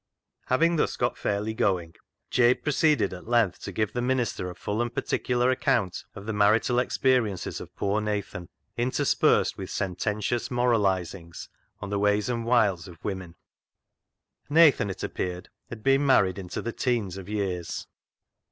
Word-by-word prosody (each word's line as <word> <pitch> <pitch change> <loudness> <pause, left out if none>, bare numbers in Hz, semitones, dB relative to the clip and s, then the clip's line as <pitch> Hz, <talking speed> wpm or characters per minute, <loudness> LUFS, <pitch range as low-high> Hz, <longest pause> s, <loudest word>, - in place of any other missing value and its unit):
" - - -58
Having 165 +6 +3
thus - - 0
got - - 0
fairly 105 +2 -2
going, 90 -6 0 0.4
Jabe 125 0 +3
pro 150 - 0
ceeded 145 -11 +2
at 90 +3 -10
length 115 -6 +2
to - - -6
give 110 -1 -1
the 120 - -1
minister 120 -7 -1
a 90 - -8
full 105 +3 -2
and 120 0 -1
particular 125 +1 0
account 95 -7 0
of 100 -1 -9
the 110 - -3
marital 110 +4 +3
ex 125 - -1
periences 120 -8 +1
of - - -11
poor 100 +2 0
Nathan, 100 -5 -4 0.3
interspersed 120 +2 +2
with - - -6
sententious 105 +5 -2
moralisings 95 -8 -1 0.3
on 100 -1 -6
the 100 - 0
ways 105 +2 +2
and 115 -2 -2
wiles 105 -7 +2
of 85 -3 -14
women. 95 -4 -5 1.1
Nathan, 150 -9 +5
it 95 - -6
appeared, 90 -1 -4 0.2
had 110 -3 -9
been 135 +1 +3
married 100 -9 +3
into 90 -2 -5
the 115 - -3
teens 115 -8 -1
of 95 0 -9
years. 95 -5 -3
105 Hz, 160 wpm, -26 LUFS, 95-120 Hz, 1.1 s, Nathan